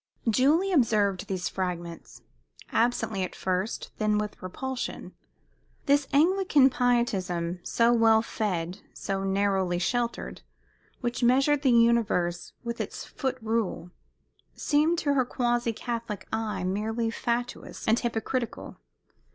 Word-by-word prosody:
Julie 295 - +3
observed 210 - +2
these 185 -2 -2
fragments, 175 -3 -5 0.5
absently 225 -4 +1
at 185 - -3
first, 185 +3 -2
then 215 -1 +2
with 210 0 -4
repulsion. 260 +8 -5 0.7
This 285 -1 +3
Anglican 305 -3 +4
pietism, 190 -9 0
so 235 +5 +2
well 225 -1 +5
fed, 185 -5 -2 0.2
so 195 -1 -3
narrowly 195 -2 +1
sheltered, 235 +6 -2 0.6
which 240 0 -2
measured 275 +4 +4
the 275 - +3
universe 230 -7 +2
with 235 0 -3
its - - -6
foot 265 -2 -3
rule, 220 -6 -1 0.6
seemed 310 +3 +2
to 290 -4 +1
her 265 -2 +3
quasi 240 -1 0
Catholic 230 -3 -5
eye 210 -4 -2
merely 220 +5 -1
fatuous 240 +1 -3
and 220 +2 +4
hypocritical. 235 +1 -3
230 Hz, 115 wpm, -27 LUFS, 195-245 Hz, 0.7 s, well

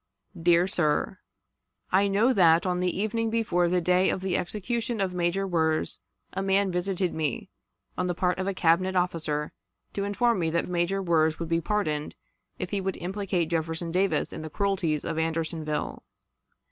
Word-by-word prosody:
"DEAR 170 +1 +3
SIR:... 175 +1 0 0.7
I 195 +2 +4
know 210 +6 +3
that, 170 -4 +5
on 180 -1 0
the 180 +1 -1
evening 225 +2 0
before 205 -6 +1
the 180 0 +2
day 180 +2 +3
of 190 - -1
the 190 -2 -1
execution 230 +5 -2
of 190 -2 0
Major 180 +2 0
Wirz, 160 -3 0 0.3
a - - -2
man 195 0 +2
visited 180 0 -1
me, 155 -5 -2 0.5
on 180 - +1
the 175 - -1
part 180 +1 0
of 190 - -2
a 195 - 0
Cabinet 185 +2 +2
officer, 160 -4 0 0.4
to 200 - -2
inform 205 +2 +1
me 165 -2 +1
that 170 +1 0
Major 180 +2 0
Wirz 160 -3 +2
would 165 -1 -5
be 165 0 +1
pardoned 155 -6 -1 0.4
if 180 - -5
he 200 -2 -1
would 190 -1 -2
implicate 185 -3 -2
Jefferson 165 +1 -2
Davis 185 -3 +1
in - - -6
the 155 - -6
cruelties 185 -5 0
of 165 -1 -2
Andersonville. 160 -2 -2
180 Hz, 170 wpm, -27 LUFS, 165-195 Hz, 0.7 s, that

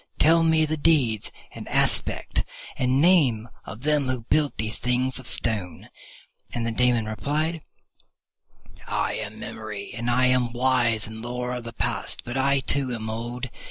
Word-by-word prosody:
Tell 165 +2 +5
me 160 -1 +4
the 155 +1 -2
deeds 140 -9 +2 0.2
and - - -8
aspect - - +1 0.3
and 130 +1 +1
name 140 -10 +4 0.2
of 105 +4 -9
them 150 -2 +2
who 130 -2 -1
built 150 -2 +2
these 110 0 -3
things 125 +1 0
of 130 - -9
Stone." 100 -8 -1 0.6
And 120 -1 -2
the 115 - -1
Daemon 120 -1 +2
replied, 150 +9 -2 1.3
"I - - 0
am - - -5
Memory, 105 -2 -7
and 120 +1 -2
am 125 -1 +3
wise 120 -3 +2
in 110 +1 -8
lore 125 +1 -3
of 125 -1 -5
the 115 - -6
past, - - -1
but 120 - -5
I 135 +1 +2
too 135 -1 +1
am 110 -1 -4
old. 120 +3 -5
125 Hz, 160 wpm, -25 LUFS, 115-140 Hz, 1.3 s, Tell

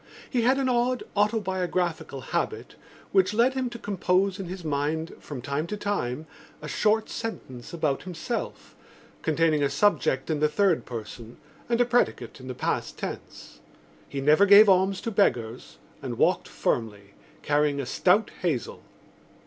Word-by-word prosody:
He 250 - 0
had 255 +3 +3
an 270 -1 0
odd 250 0 +1
autobiographical 185 - -1
habit 170 - -3 0.4
which 380 - +3
led 240 +4 +4
him 260 -2 -1
to 240 - -8
compose 195 -1 0
in 190 - -5
his 180 -1 -7
mind 155 +2 -1
from 135 -5 -8
time 140 +5 -2
to 210 - -4
time 160 -9 -2 0.3
a 150 - -8
short 215 +8 +1
sentence 130 - -6
about 155 -5 -1
himself 185 +6 -5 0.5
containing 160 -1 +2
a 140 - +2
subject 140 -2 +1
in 155 - 0
the 150 0 +3
third 190 0 +1
person 115 0 -8 0.3
and 235 0 +1
a 245 - +5
predicate 235 - 0
in 130 - -10
the 130 - -5
past - - -2
tense. - - -8 0.5
He 140 - -4
never 155 +8 +5
gave 205 +2 +9
alms 190 0 +3
to 230 - -3
beggars 120 - 0 0.2
and - - -5
walked - - +2
firmly, 100 -4 -3 0.3
carrying 145 -1 +1
a 140 - -2
stout 185 - +2
hazel. 160 -10 -2
175 Hz, 155 wpm, -26 LUFS, 140-210 Hz, 0.5 s, gave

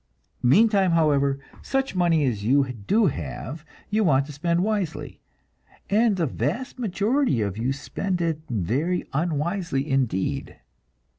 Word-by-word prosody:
Meantime, 195 - +4
however, 140 -4 +3 0.2
such 270 0 -1
money 170 -5 +2
as 110 -6 -1
you 135 +3 +2
do 165 - +1
have, 130 - -4 0.3
you 215 +1 +2
want 140 -6 +3
to 150 - -9
spend 170 +4 0
wisely, 205 -6 -3 0.7
and 215 0 +4
the 175 -3 0
vast 255 - -3
majority 225 - +1
of 100 -3 -1
you 120 +5 -1
spend 180 +6 -3
it 165 -3 0
very 130 - -1
unwisely 160 -1 -1
indeed. 130 -9 -1
160 Hz, 130 wpm, -24 LUFS, 135-195 Hz, 0.7 s, Meantime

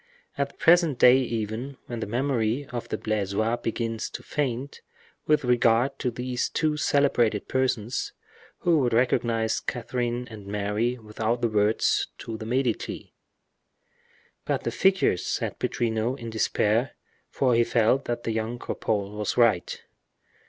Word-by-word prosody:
At 140 0 -1
the - - -21
present 165 -5 +4
day 125 +1 +7
even, 120 +2 -3
when 120 -1 -5
the 110 - -3
memory 125 +1 0
of 120 -2 -5
the - - -2
Blaisois 110 +2 -1
begins 115 -1 -3
to - - -8
be - - -23
faint 140 -1 -3 0.5
with 150 -1 +3
regard 120 +2 +3
to 125 - 0
these 125 +1 -2
two 155 -2 0
celebrated 130 -8 +2
persons, 125 -3 -1 0.5
who 170 -3 +3
would 125 -4 +1
recognize 115 -2 +1
Catherine 120 0 -3
and 105 -3 -11
Mary 105 +4 -1
without 110 +1 -2
the 120 - +2
words 105 +1 +2
'To 115 - -6
the 110 - -6
Medici'?" 125 -1 -2 1.3
"But - - -1
the - - -1
figures?" 190 - +2
said - - -3
Pittrino, 115 +1 -1
in 115 -3 -7
despair; 110 +3 +1 0.3
for 130 -2 +1
he 120 0 +4
felt 120 +3 +2
that 120 0 -3
young 115 +1 -2
Cropole 105 -3 -2
was 105 -1 -2
right. 115 -7 +2
120 Hz, 145 wpm, -26 LUFS, 110-130 Hz, 1.3 s, day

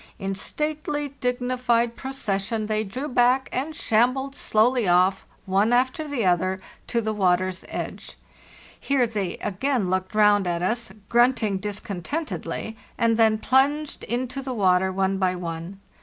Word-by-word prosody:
In 195 -1 -3
stately, 295 +6 -3
dignified 245 -1 +1
procession 220 -5 -2
they 215 0 0
drew 250 +8 -5
back 250 0 +3
and 295 +5 -2
shambled 255 +5 +1
slowly 235 -1 +2
off, 185 +2 +3 0.2
one 195 +4 +2
after 260 +5 +1
the 270 -8 -1
other, 185 +1 +1 0.3
to 235 - 0
the 220 -1 -2
water's 185 -2 +1
edge. - - -6 0.6
Here 275 -3 +2
they 205 -6 -3
again 210 0 -1
looked 185 +2 -2
round 205 -2 +4
at 175 0 -1
us, 225 +2 -1 0.2
grunting 235 -5 +3
discontentedly, 210 - -4 0.2
and 230 -1 +3
then 220 -1 +4
plunged 280 +6 +1
into 255 +2 -2
the 260 -2 -4
water 190 -2 +3
one 190 0 0
by 185 -1 +1
one. 170 +2 -6
220 Hz, 140 wpm, -24 LUFS, 190-255 Hz, 0.6 s, round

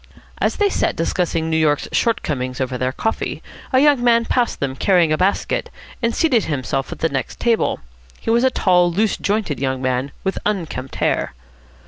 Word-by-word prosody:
As - - +1
they 415 - +2
sat - - 0
discussing 165 -3 -1
New 160 - 0
York's 150 -2 +2
shortcomings 130 - -1
over 130 -1 -2
their 130 +1 -1
coffee, 220 +11 -3 0.3
a 260 - +3
young 285 -3 +4
man 235 -1 +4
passed 245 0 0
them, 135 -1 -2
carrying 175 +1 +3
a - - +1
basket, 190 +2 0 0.3
and 230 -1 0
seated 265 -10 +2
himself 135 -2 -2
at - - -6
the 165 - +3
next 135 -3 -4
table. 230 - +1 0.4
He - - -2
was 235 +2 +3
a 260 - +5
tall, 180 -7 +3
loose 210 +5 +1
jointed 200 - -1
young 130 -1 -1
man, 130 +1 -1
with 190 - -1
unkempt 165 -10 -3
hair. - - 0
175 Hz, 180 wpm, -20 LUFS, -, 0.4 s, a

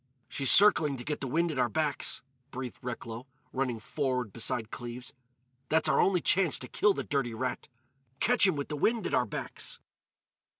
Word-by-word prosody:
"She's 135 -2 -1
circling 165 -9 +6
to 120 - -7
get 150 +2 -4
the 135 - -3
wind 165 +6 0
at 145 - -4
our 125 -1 +2
backs," 150 +5 -1 0.3
breathed 125 -1 -7
Recklow, 120 0 -7 0.3
running 130 -3 -2
forward 125 -3 -2
beside 115 -1 -2
Cleves. 120 +2 -8 0.6
"That's 160 0 +3
our - - +3
only 185 -3 +2
chance 185 -6 +4
to 125 - -5
kill 205 +8 +2
the - - -3
dirty 135 -5 -2
rat—catch 130 - -1
him 185 - +1
with 140 -1 -4
the 150 - -3
wind 225 +6 +1
at - - -3
our 125 - +2
backs!" - - -5
130 Hz, 175 wpm, -29 LUFS, 120-155 Hz, 0.6 s, circling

